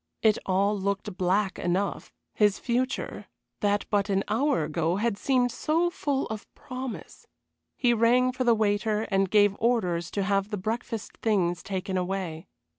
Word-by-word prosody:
It 215 -2 +4
all 195 +2 +2
looked 200 0 -2
black 190 +1 +1
enough 185 +3 -1 0.2
his 210 -2 +3
future, 255 +2 -2 0.3
that 205 0 +1
but 205 -1 +1
an 195 0 +1
hour 270 - +2
ago 160 +2 0
had 220 +1 0
seemed 250 +2 +1
so 330 +7 +1
full 280 -5 -1
of 215 -1 -7
promise. 255 -1 -7 0.5
He 245 -2 +3
rang 245 +3 +4
for 255 0 -2
the 235 -2 +4
waiter 215 0 +1
and 195 -1 +2
gave 205 -1 +4
orders 180 -8 +1
to 200 - +2
have 195 0 +1
the 210 - -3
breakfast 225 +2 -4
things 180 -6 +1
taken 190 0 -3
away. 180 -3 -3
205 Hz, 155 wpm, -27 LUFS, 190-235 Hz, 0.5 s, It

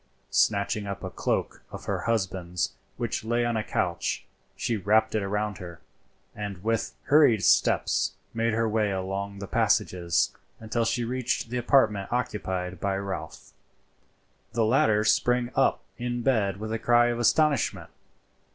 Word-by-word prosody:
Snatching 100 0 +1
up 100 -1 -5
a - - -4
cloak - - -2
of - - -9
her - - -1
husband's 95 -5 -1 0.2
which - - -2
lay 120 +1 0
on 120 -1 0
a 110 - 0
couch, - - -2 0.3
she 115 - -1
wrapped 110 +2 +2
it 110 -2 0
round 105 0 -2
her, 85 -2 -9 0.6
and 100 -3 -6
with 115 0 -1
hurried 140 -8 +5
steps - - +3 0.2
made 115 0 +1
her 115 +1 +1
way 110 -1 +1
along 100 +1 -3
the 100 - -6
passages 85 -2 +1 0.2
until 115 +1 -1
she 120 +1 0
reached 125 0 -2
the 125 - -1
apartment 110 -6 +2
occupied 95 -7 -2
by 100 +1 -1
Ralph. 95 -5 -6 1.0
The 115 0 +2
latter 110 -2 +3
sprang 120 +3 +2
up 135 - +2 0.2
in 120 0 -2
bed 105 -8 +1
with 110 +2 -5
a 115 - -2
cry 120 +1 +4
of 120 0 -2
astonishment. 145 +4 +2
110 Hz, 150 wpm, -27 LUFS, 100-120 Hz, 1.0 s, hurried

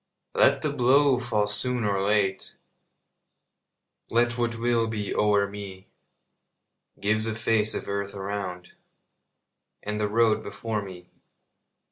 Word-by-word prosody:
Let - - +3
the - - -1
blow 130 +1 +4
fall 110 -4 0
soon 120 +4 0
or 100 -2 0
late, 100 -1 0 1.5
Let 120 +1 +2
what 120 -1 -1
will 115 -1 +1
be 105 -2 -3
o'er 105 -1 +2
me; 100 -2 -9 1.1
Give 105 +2 +1
the 110 0 -3
face 110 -1 +1
of - - -5
earth 100 0 -3
around 95 -2 -5 1.1
And 105 +1 -3
the 105 -1 0
road 110 0 +3
before 110 -2 -4
me. 90 -3 -11
105 Hz, 120 wpm, -26 LUFS, 100-115 Hz, 1.5 s, blow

